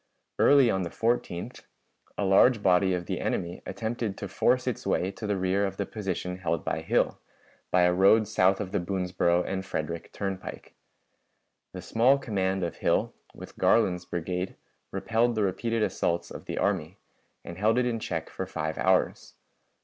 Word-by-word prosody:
Early 140 -5 +6
on 95 - 0
the 85 - -3
14th 115 -6 -2 0.6
a 100 - 0
large 105 +4 +5
body 95 0 +4
of 90 -1 -4
the - - -3
enemy 85 0 -2
attempted 110 0 -3
to - - -5
force - - +1
its - - -3
way 95 +2 +1
to 105 - -7
the 100 -1 0
rear 95 +2 +1
of 95 -1 -2
the 100 - -1
position 90 -4 -4
held 85 -3 -2
by - - -1
Hill, - - +1 0.5
by 90 0 +4
a 90 0 +4
road 100 +4 +5
south 95 -2 +3
of 100 -3 -4
the - - 0
Boonsboro 90 -1 0
and 95 0 -3
Frederick 85 -3 -4
turnpike. 95 -2 -6 1.0
The - - -7
small 125 +5 +4
command 95 -6 -1
of 85 - -3
Hill, - - +1 0.2
with - - -11
Garland's 90 -1 +3
brigade, 90 +2 -3 0.3
repelled 115 +1 0
the 110 - +1
repeated 110 +4 0
assaults 85 -4 -1
of - - -9
the - - -5
army, 80 +6 -1 0.5
and 85 +1 -8
held 110 +3 +3
it 125 - +2
in 115 -2 -1
check 80 -6 -3
for 95 - -5
five 80 -3 -4
hours. - - +1
95 Hz, 170 wpm, -27 LUFS, 90-110 Hz, 1.0 s, Early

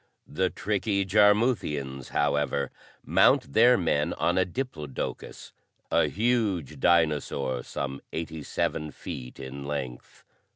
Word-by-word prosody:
The 95 +5 0
tricky 100 -1 -1
Jarmuthians, 100 - +2
however, 70 -1 0 0.3
mount 70 - +4
their 120 +2 +6
men 75 -5 +1
on - - 0
a 95 - +3
diplodocus, 90 - -5 0.4
a - - +4
huge 110 - 0
dinosaur 75 -6 +1
some 70 +2 -5
eighty 80 -1 -5
seven 75 +1 -2
feet 65 -3 -8
in 70 +1 -7
length. 70 -4 -6
75 Hz, 110 wpm, -27 LUFS, 70-100 Hz, 0.4 s, their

